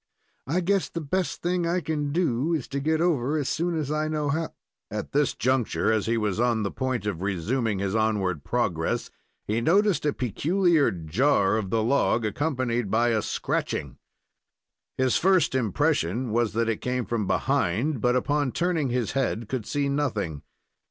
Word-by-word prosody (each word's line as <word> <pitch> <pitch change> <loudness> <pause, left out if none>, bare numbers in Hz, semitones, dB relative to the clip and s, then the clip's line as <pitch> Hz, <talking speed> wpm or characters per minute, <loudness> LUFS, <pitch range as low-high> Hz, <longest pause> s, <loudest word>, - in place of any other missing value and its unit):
I 170 +7 +1
guess 195 +2 +1
the 170 - -4
best 175 +4 -2
thing 175 0 0
I 175 +2 +1
can 150 -4 -2
do 160 -1 +1
is 145 - -4
to 140 - -2
get 155 +3 +1
over 155 -4 +1
as 145 -4 -1
soon 170 +4 -1
as 150 -2 -2
I 155 0 0
know 150 -2 -1
how 160 +3 -1 0.2
" - - -62
At 105 0 -5
this 145 -2 +1
juncture, 125 -2 +1
as 110 -1 0
he 115 +1 +1
was 105 -2 -1
on 120 -2 +2
the 100 - -2
point 130 -5 -2
of 95 -5 -3
resuming 100 +4 -1
his 95 0 -2
onward 105 -8 0
progress, 90 -9 -1 0.3
he 110 +3 0
noticed 195 - +3
a - - +3
peculiar 160 - +2
jar 95 - +1
of 110 -4 -2
the 110 +2 +1
log, 120 -2 +2
accompanied 125 -2 -1
by 115 +3 +2
a 110 -2 +1
scratching. - - -3 1.0
Mis 130 -1 +2
first 185 -5 +3
impression 125 - 0
was 115 -1 +1
that 115 +1 +1
it 115 -2 -1
came 125 -1 -1
from 110 -4 -2
behind, 115 - 0
but, 125 0 +2
upon 145 +1 +1
turning 170 -5 0
his 120 -2 -1
head, 120 -5 -1
could 125 -3 -4
see 145 -1 0
nothing. 110 - -1
130 Hz, 180 wpm, -26 LUFS, 110-155 Hz, 1.0 s, noticed